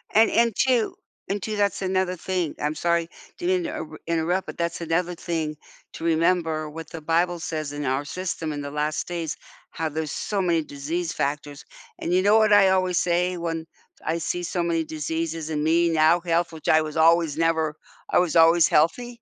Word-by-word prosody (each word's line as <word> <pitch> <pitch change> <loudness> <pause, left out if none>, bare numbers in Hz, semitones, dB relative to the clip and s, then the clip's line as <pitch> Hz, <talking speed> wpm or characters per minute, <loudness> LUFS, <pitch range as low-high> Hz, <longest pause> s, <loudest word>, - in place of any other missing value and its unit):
And 220 +1 +6
and, 235 0 +3
too 250 -4 +1 0.3
and, 200 0 -3
too, 215 - -3
that's 200 -1 0
another 185 -1 0
thing, 180 -2 -2
I'm 150 +1 -1
sorry 170 +1 0 0.3
to 350 - -3
inter 330 - -2
interrupt, 170 +3 0
but - - -7
that's 170 0 -2
another 170 +2 0
thing 160 -3 -3 0.4
to - - -8
remember 165 -1 +1
what 165 0 -8
the 165 - -8
Bible 170 +2 +1
says, 155 -2 -4
in 145 -1 -4
our 135 +2 0
system 165 0 -4
in 145 -1 -4
the 145 - -6
last 150 +1 -2
days, 170 -3 -4 0.3
"How 160 -1 -3
there's 155 -1 -3
so 205 -2 -2
many 170 -3 +1
disease 155 +4 -4
factors," 145 0 -3 0.3
and 170 - -3
you 185 - +3
know 210 +2 +5
what 215 -1 +3
I 205 -2 +7
always 185 -2 +2
say 180 +1 +1
when 165 -1 -4 0.4
I 160 +2 -1
see 175 +2 -2
so 175 0 -2
many 165 -1 0
diseases 160 +1 -4
in 150 -1 -1
me, 170 +2 +3
now 160 +1 +4
health, 170 0 0
which 160 -1 -10
I 155 - +5
was 155 0 -5
always 165 -2 +4
never 160 -2 +1 0.3
I - - +2
was 180 -3 +2
always 165 0 +6
healthy? 235 +10 +1
165 Hz, 195 wpm, -24 LUFS, 155-180 Hz, 0.4 s, I